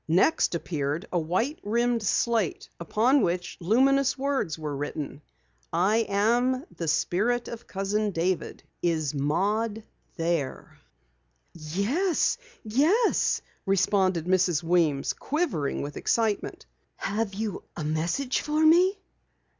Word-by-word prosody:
Next 175 - +3
appeared 150 -2 -2
a 175 - +2
white 190 - -1
rimmed 235 +2 +1
slate, 220 -2 0
upon 230 - +2
which 175 +1 -1
luminous 265 +9 +3
words 265 - -1
were 150 -2 -4
written: 145 0 -5 0.5
"I 210 +6 +2
am 240 +7 +2
the 165 - -4
Spirit 220 +10 +1
of 235 0 -8
Cousin 205 +2 -1
David. 180 0 -2 0.2
Is 160 -4 0
Maud 205 +10 0 0.3
here?" 165 -5 -2 0.7
"Yes, 210 - 0 0.2
yes," 305 - +2 0.2
responded 190 -3 +2
Mrs. 180 -3 +2
Weems, 165 -5 +2
quivering 280 - -2
with 145 +1 -6
excitement. 220 -3 -1 0.3
"Have 205 0 -2
you 215 -1 -3 0.2
a 155 - -3
message 170 - -1
for 300 0 -1
me?" 365 +5 +5
200 Hz, 110 wpm, -27 LUFS, 165-245 Hz, 0.7 s, me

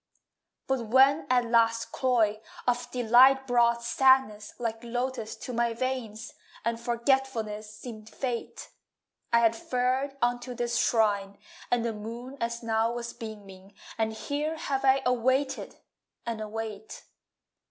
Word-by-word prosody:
But 260 -4 -1
when 270 +6 +4
at 250 -1 +3
last 230 -1 +2
cloy 225 -5 +1 0.3
Of 245 0 0
delight 255 +3 +5
brought 235 -1 +2
sadness 235 -3 +3
Like 225 -1 -4
lotus 245 -1 -3
to 250 - -7
my 235 0 0
veins, 245 -2 -4 0.3
And 230 0 -1
forgetfulness 235 -3 -1
seemed 215 0 -10
fate, 245 0 -5 0.6
I 235 0 +5
had 230 -1 +4
fared 255 +4 -1
unto 245 0 -1
this 235 -1 -1
shrine 200 -3 +1 0.3
And 240 -1 +1
the 230 - -1
moon 230 +5 -7
as 235 +1 -2
now 225 0 +1
was 235 0 -5
beaming, 200 -4 -10 0.2
And 220 -1 0
here 295 +7 -3
have 275 -4 -2
I 270 0 +4
awaited 260 +3 0 0.5
and 230 -2 -3
await. 215 -1 -6
235 Hz, 130 wpm, -28 LUFS, 225-255 Hz, 0.6 s, delight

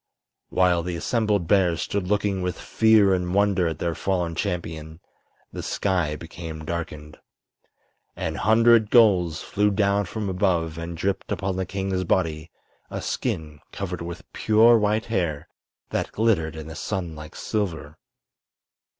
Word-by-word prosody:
While 90 -2 +3
the 90 +1 -4
assembled 105 0 0
bears 90 -4 +3
stood 100 -3 -2
looking 100 -1 0
with 90 -2 -3
fear 110 -3 +4
and 90 0 -1
wonder 100 -3 +3
at 80 -2 -3
their 85 +1 -1
fallen 90 -2 -1
champion 80 -4 -4 0.5
the - - -5
sky 90 -6 0
became 80 0 -8
darkened. 75 -2 -5 1.0
An - - -3
hundred 115 0 +4
gulls 95 -9 +4
flew 105 +1 +1
down 100 0 +1
from 105 +3 -4
above 90 -4 0
and 85 0 -6
dripped 95 +3 -2
upon 95 -1 -1
the 95 -1 -2
king's 95 -1 -2
body 80 -3 0 0.4
a - - -4
skin 75 -2 -3
covered 90 -3 -5
with 85 0 -6
pure 115 +2 +5
white 105 +1 +1
hair 85 -10 -2 0.4
that - - -2
glittered 95 -8 +1
in 80 -1 -7
the 80 - -8
sun 90 -6 -4
like 75 0 -10
silver. 80 -8 -3
90 Hz, 140 wpm, -24 LUFS, 80-100 Hz, 1.0 s, pure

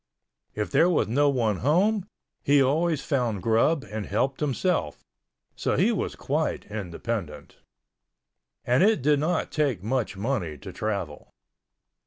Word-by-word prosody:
If 105 0 -3
there 160 +5 +4
was 175 - +2
no 145 +6 +3
one 115 -7 +1
home, 190 - +2 0.3
he 145 0 +4
always 150 +3 +1
found 120 - -1
grub 115 +7 +2
and 105 -2 -5
helped 130 +6 -1
himself, 150 - -1 0.5
so - - -1
he - - +3
was - - -2
quite - - -2
independent—and 100 -2 -5 1.2
it 215 - +3
did 145 0 +3
not 160 +3 -1
take 140 - 0
much 115 -3 -1
money 100 - -2
to - - -10
travel. 100 -9 -4
130 Hz, 130 wpm, -26 LUFS, 105-150 Hz, 1.2 s, there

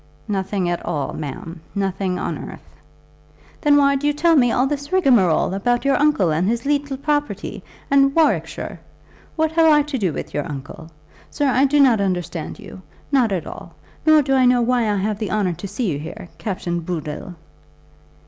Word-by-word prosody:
"Nothing 195 -2 -1
at 175 0 -2
all, 150 -5 -3
ma'am; 160 +3 -7
nothing 195 -2 -1
on - - -3
earth." - - -12 0.9
"Then 290 -1 +4
why 280 -1 +4
do 285 +2 -1
you 295 - +2
tell 325 +3 +3
me 245 -5 +4
all 250 - +2
this 285 +1 -4
rigmarole 240 - +3
about 240 +6 0
your 275 -1 +3
uncle 280 - +2
and 165 +4 +1
his 230 +3 -1
leetle 285 -1 0
property, 295 +1 -2 0.3
and 275 0 +4
Warwickshire? 325 -1 0 0.6
What 315 -1 +1
have 320 -1 +4
I 295 -1 +5
to 290 -2 -4
do 190 -5 0
with - - -6
your 145 - -3
uncle? 145 +3 -8 0.4
Sir, 290 - -1
I 265 +1 +3
do 290 +2 +2
not 250 -7 +5
understand 180 -4 -3
you, 185 - -11 0.3
not 255 -6 +3
at 185 -4 -2
all. - - -10 0.3
Nor 310 -1 +5
do 270 0 0
I 260 -1 +4
know 245 -1 +4
why 240 -2 +1
I - - 0
have 205 +1 -2
the 215 - -3
honour 200 -4 0
to 200 - -7
see 210 -1 -2
you 145 - -3
here, 175 +4 -8
Captain 180 -4 -3
Bood 170 -2 -4
dle." 155 +4 -7
230 Hz, 190 wpm, -21 LUFS, 180-280 Hz, 0.9 s, I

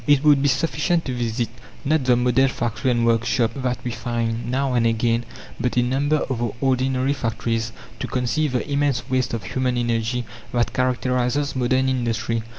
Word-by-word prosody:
It 145 -1 +4
would 145 -2 +5
be 145 - +3
sufficient 155 +4 +1
to 130 - -2
visit, 120 -1 -1 0.4
not 150 -1 +2
the 125 -1 +5
model 125 +2 +3
factory 120 -1 -1
and 120 -1 +2
workshop 115 0 +2
that 125 -2 -1
we 125 - -2
find 115 -1 -2
now 135 +1 0
and 120 -2 +3
again, 115 +1 +1 0.3
but 125 0 -1
a 125 - +5
number 140 +5 +1
of 130 -4 -2
the 120 -2 -1
ordinary 130 0 +1
factories, 115 -3 -2 0.3
to - - -3
conceive 130 +3 0
the 125 - -1
immense 140 -4 0
waste 130 -2 +1
of 110 - -5
human 125 +5 -1
energy 120 0 0 0.3
that 120 -1 +1
characterizes 125 +2 0
modern 130 +1 +2
industry. 115 -3 0
125 Hz, 175 wpm, -22 LUFS, 120-135 Hz, 0.4 s, would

